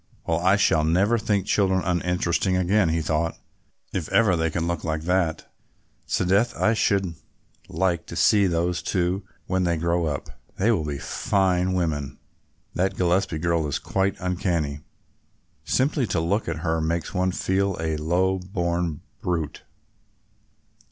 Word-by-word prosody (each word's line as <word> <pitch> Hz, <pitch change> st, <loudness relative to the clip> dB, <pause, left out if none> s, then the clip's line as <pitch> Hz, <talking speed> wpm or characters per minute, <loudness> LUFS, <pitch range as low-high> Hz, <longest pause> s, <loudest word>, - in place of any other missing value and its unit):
"Well, 80 Hz, 0 st, +1 dB
I 95 Hz, +3 st, +4 dB
shall 80 Hz, -6 st, +3 dB
never 95 Hz, +9 st, +2 dB
think 100 Hz, -3 st, 0 dB
children 95 Hz, -2 st, +2 dB
uninteresting 90 Hz, +1 st, 0 dB
again," 95 Hz, 0 st, +2 dB
he 80 Hz, 0 st, 0 dB
thought, 80 Hz, +1 st, -1 dB, 0.6 s
"if 85 Hz, -4 st, -3 dB
ever 110 Hz, -5 st, +4 dB
they 80 Hz, -1 st, 0 dB
can 85 Hz, +1 st, -2 dB
look 85 Hz, -2 st, -2 dB
like 80 Hz, -1 st, -2 dB
that. 90 Hz, -2 st, 0 dB, 0.6 s
'Sdeath, 100 Hz, +6 st, +1 dB
I 110 Hz, -, +3 dB
should 100 Hz, -5 st, +1 dB, 0.6 s
like 85 Hz, -3 st, 0 dB
to -, -, -7 dB
see 100 Hz, +4 st, +4 dB
those 85 Hz, +1 st, 0 dB
two 90 Hz, +1 st, 0 dB, 0.2 s
when 95 Hz, 0 st, 0 dB
they 85 Hz, -1 st, +1 dB
grow 85 Hz, +1 st, 0 dB
up, 70 Hz, -2 st, -4 dB, 0.3 s
they 105 Hz, +5 st, +3 dB
will 85 Hz, -9 st, 0 dB
be 75 Hz, -2 st, -3 dB
fine 95 Hz, +2 st, 0 dB
women. 75 Hz, -7 st, -2 dB, 0.6 s
That 95 Hz, +2 st, 0 dB
Gillespie 90 Hz, -1 st, +1 dB
girl 85 Hz, -1 st, 0 dB
is 70 Hz, -, -1 dB
quite 95 Hz, 0 st, -1 dB
uncanny, 85 Hz, -6 st, -1 dB, 0.9 s
simply 135 Hz, -1 st, +1 dB
to 85 Hz, -, 0 dB
look 95 Hz, +7 st, 0 dB
at 80 Hz, -1 st, -4 dB
her 80 Hz, 0 st, +1 dB
makes 85 Hz, +1 st, -2 dB
one 95 Hz, 0 st, +1 dB
feel 95 Hz, +1 st, 0 dB
a 80 Hz, -1 st, -1 dB
low 90 Hz, +5 st, +1 dB
born 85 Hz, -4 st, -2 dB, 0.2 s
brute. 80 Hz, -5 st, -2 dB
90 Hz, 150 wpm, -24 LUFS, 80-95 Hz, 0.9 s, I